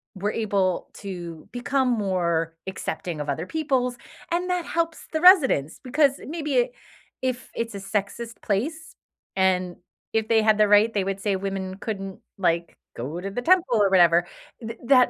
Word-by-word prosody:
were 205 +3 -1
able 195 -4 0
to 175 -5 -8
become 260 +2 0
more 175 -7 0
accepting 180 -4 -4
of 145 - -5
other 160 +5 -2
peoples, 260 -3 -1 0.3
and 355 +2 -1
that 360 -2 0
helps 330 -1 -2
the 315 - 0
residents 285 - +5
because 280 +1 +2
maybe 330 +11 0 0.5
if 255 -1 -2
it's 230 -2 -3
a - - -3
sexist 205 +4 -4
place 300 +11 -2 0.4
and 185 -1 +1 0.4
if 220 -1 +1
they 225 -1 +4
had 215 -1 +4
the 210 -1 +5
right, 210 +2 +5
they 200 -2 +1
would 195 0 -3
say 200 -3 0
women 190 -1 -4
couldn't 195 -3 -5 0.2
like, 170 -2 0 0.2
go 150 +9 -4
to 195 - -4
the 245 +5 -4
temple 340 -6 +3
or 200 - +4
whatever. 175 -2 +5 0.3
Th 225 0 -6
that 255 -1 +6
210 Hz, 165 wpm, -25 LUFS, 185-255 Hz, 0.5 s, that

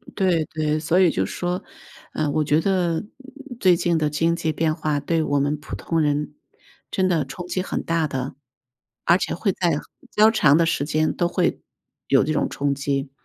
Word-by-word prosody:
对 180 -4 +2
对， 155 -1 -1
所 160 +3 +1
以 180 -3 +5
就 95 -9 0
是 - - -7
说， 180 +1 -2 0.5
呃， 150 -2 0
我 155 +1 +1
觉 150 +2 +3
得， 180 -2 +1
呃， - - -8 0.6
最 185 -3 +5
近 170 -1 +1
的 155 -1 +1
经 165 +3 +1
济 165 -2 -1
变 155 0 0
化 150 -2 -1
对 160 +3 0
我 145 -2 +1
们 145 +2 0
普 150 - -8
通 165 -1 -1
人， 150 0 0 0.6
真 185 -1 +1
的 165 -6 +1
冲 175 +6 -8
击 185 +1 -2
很 - - -3
大 165 -1 0
的， 135 -1 -4 0.7
而 170 - +5
且 - - -2
会 195 +3 0
在 175 -1 0 0.3
比 - - -21
较 215 +1 +6
长 150 -10 +4
的 170 - +3
时 165 -3 0
间 155 +1 0
都 175 - 0
会 - - 0 0.5
有 - - +4
这 155 - -1
种 150 - 0
冲 140 0 -1
击。 140 0 -2
160 Hz, 220 characters per minute, -23 LUFS, 150-175 Hz, 0.7 s, 较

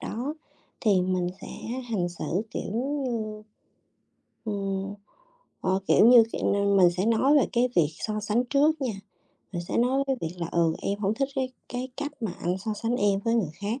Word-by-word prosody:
đó 265 +7 -4 0.5
thì 200 -5 +3
mình 180 -1 0
sẽ - - -8 0.4
hành 180 -6 0
xử, 175 - -7 0.3
kiểu - - -4
như, 235 -5 -2 1.0
ừm, 195 -2 -3 0.7
ờ, 190 +1 +1
kiểu - - +6
như, 240 -2 +9
kiểu - - 0
nên 200 0 +2
mình 180 -2 +6
sẽ 185 +3 -1
nói 255 +6 +4
về - - +3
cái 245 +1 +3
việc 160 -4 +5
so 215 -1 -2
sánh 215 +4 +1
trước 290 +4 +2
nha, 250 -4 0 0.6
mình 175 -2 -3
sẽ - - -1
nói 260 +3 +2
cái 270 -1 +1
việc 165 +1 -4
là 170 - -2
"Ừ, 165 -1 +3
em 200 +1 -1
hổng 205 0 0
thích 275 +3 0
cái 260 -1 0 0.2
cái 250 +1 -4
cách 290 0 -3
mà 215 -5 -1
anh 180 +2 0
so 215 +3 -3
sánh 230 +3 -1
em 200 -3 +2
với 230 0 +2
người 210 -10 +1
khác. 210 - -3
215 Hz, 195 wpm, -27 LUFS, 190-250 Hz, 1.0 s, như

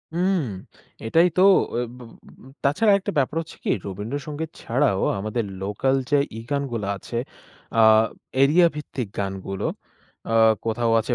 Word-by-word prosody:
উম 185 +1 +2 0.6
এটাই 165 +10 +4
তো - - +5 0.3
ওই 120 - 0
ব - - -14
ব 120 +2 -15 0.2
তাছাড়া 155 +10 +3
আর 200 - +5
একটা 200 +1 -4
ব্যাপার 145 +2 +1
হচ্ছে 165 - -11
কী - - -2 0.2
রবীন্দ্র 105 +7 -4
সঙ্গীত 155 +1 -4
ছাড়াও 120 -5 +1 0.2
আমাদের 110 +4 -2 0.2
লোকাল 105 +7 0
যে 145 - +4 0.2
ই - - -5
গানগুলা 130 -8 -2
আছে 115 - -6 0.6
আ - - +3 0.6
এরিয়া 160 +6 +6
ভিত্তিক 135 -5 -5
গানগুলো 95 -1 -3 0.6
আ - - -4 0.3
কোথাও 115 +1 0
আছে 115 - -2
130 Hz, 150 wpm, -23 LUFS, 110-150 Hz, 0.6 s, এরিয়া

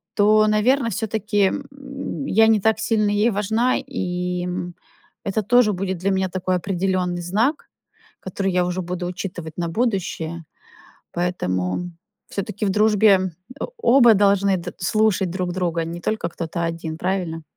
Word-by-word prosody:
то, 215 +1 +5
наверное, 230 +4 +2
все-таки, 210 -1 0 0.3
м, 275 0 -6
я 220 -1 +5
не 220 -2 +4
так 220 0 +2
сильно 215 -3 +1
ей 210 +3 +3
важна, 220 +5 +1
и, 180 0 -3
м, 180 -1 -4 0.5
это 205 +2 -1
тоже 240 -1 +4
будет 190 0 -3
для 195 +2 0
меня 190 0 0
такой 185 0 -1
определенный 180 -1 -1
знак, 220 - 0 0.5
который 190 +1 -2
я 180 0 +2
уже 180 +1 -2
буду 180 0 -4
учитывать 175 -3 -6
на 170 - -1
будущее. 170 -6 -2 0.7
Поэтому 170 - -2 0.4
все-таки 200 +1 -3
в 195 - +1
дружбе, 210 +1 +4 0.5
э, - - 0
оба 245 - +6
должны 200 -1 +3
д 175 0 -7
слушать 205 0 +1
друг 180 -1 -2
друга, 170 -2 -1
не 170 +1 -6
только 215 -3 -2
кто-то 170 0 -4
один, 165 -1 -4
правильно? 170 -4 -2
190 Hz, 145 wpm, -22 LUFS, 175-215 Hz, 0.7 s, оба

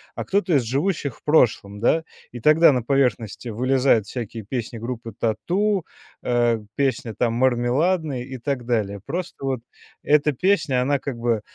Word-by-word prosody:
а - - -4
кто-то 200 -2 +1
из 135 - +3
живущих 140 - -1
в - - -28
прошлом, 110 -9 +2
да? 160 +9 +2 0.3
И 120 - -8
тогда 155 +5 +6
на 125 - 0
поверхности 125 -3 0
вылезают 125 -1 +2
всякие 115 -2 -6
песни 115 +1 -5
группы 115 -1 -6
"Тату", 180 - 0 0.4
э, 120 -2 +2 0.2
песня 130 -5 -1
там 120 -2 0
"Мармеладно" 130 +5 +1
и 130 +1 -7
так 130 -1 -3
далее. 105 -4 -1
Просто 170 -2 -5
вот 135 -2 -1 0.4
эта 150 0 +3
песня, 155 -5 +1
она 140 +3 +1
как 130 -2 -5
бы 115 -2 0
125 Hz, 155 wpm, -23 LUFS, 115-150 Hz, 0.4 s, тогда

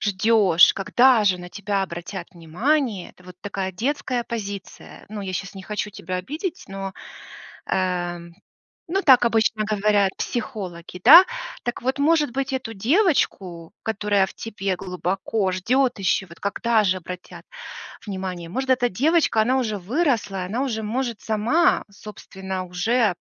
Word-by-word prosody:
ждёшь, 200 -4 +4
когда 240 +3 +4
же 185 -3 +3
на 180 0 -9
тебя 200 +1 -2
обратят 175 0 -6
внимание. 205 - -1
Это 180 - -22
вот 180 -1 -12
такая 195 -2 -4
детская 250 +3 -2
позиция. 205 -5 -7
Ну 210 0 -6
я 190 -1 -5
щас 195 +2 -5
не 190 - -8
хочу 210 +1 -4
тебя 185 -2 -5
обидеть, 320 - -5
но, 195 0 -5 0.8
э, 180 -2 -1 0.7
ну 390 +1 +1
так 260 -6 +6
обычно 225 -1 +2
говорят 205 -1 +2
психологи, 180 -7 -5
да. 325 +10 +11 0.4
Так 240 - -3
вот, 260 +3 -1
может 295 -2 +2
быть, 270 +2 -2
эту 255 -4 -4
девочку, 200 - 0
которая 205 -2 +1
в - - -11
тебе 200 -4 -3
глубоко 190 +2 -2
ждет 245 +7 +1
еще, 190 0 +1
вот 170 -1 -15
когда 220 +2 +1
же 185 -1 +2
обратят 180 0 -9 0.6
внимание? 185 -3 -5
Может, 265 +9 -3
эта 250 -1 +3
девочка- 290 - +2
она 255 +4 +2
уже 220 -5 -1
выросла, 215 - -1
и - - -4
она 225 +8 -2
уже 225 -5 -3
может 235 +1 -3
сама, 245 +12 +2
собственно, 190 -2 -7
уже 205 +4 +1
210 Hz, 145 wpm, -23 LUFS, 185-245 Hz, 0.8 s, да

